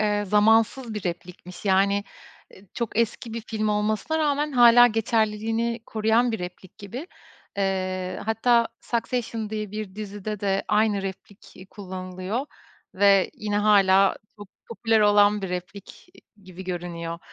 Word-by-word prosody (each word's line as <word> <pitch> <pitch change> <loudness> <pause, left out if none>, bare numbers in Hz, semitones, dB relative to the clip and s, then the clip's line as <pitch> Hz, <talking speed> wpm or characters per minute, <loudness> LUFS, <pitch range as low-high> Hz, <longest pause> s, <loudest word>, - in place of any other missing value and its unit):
eee, 210 -1 +1
zamansız 225 +4 +2
bir 210 - -5
replikmiş. 175 +1 -7
Yani, 200 +1 +2 0.7
çok 230 -1 -3
eski 230 0 -1
bir 230 - -4
film 215 -1 -3
olmasına 215 +9 0
rağmen 295 -1 0
hâlâ 245 -1 +7
geçerliliğini 225 +1 0
koruyan 225 +2 +1
bir 220 - -2
replik 180 +2 -9
gibi. 235 - -7 0.5
Eee, 185 -1 -2
hatta 230 +1 +2
"Succession" 230 -2 -3
diye 215 -2 -4
bir 210 -3 -6
dizide 205 0 -6
de 195 -1 0
aynı 210 -2 +2
replik 195 +1 -9 0.2
kullanılıyor 185 +5 -5 0.5
ve 195 0 +4
yine 210 -1 -2
hâlâ 195 -2 +4 0.2
çok 205 -2 -11 0.2
popüler 225 -1 +1
olan 205 0 +4
bir 190 - -3
replik 180 - -8 0.4
gibi 185 0 -11
görünüyor. 170 -2 -5
210 Hz, 130 wpm, -24 LUFS, 190-225 Hz, 0.7 s, hâlâ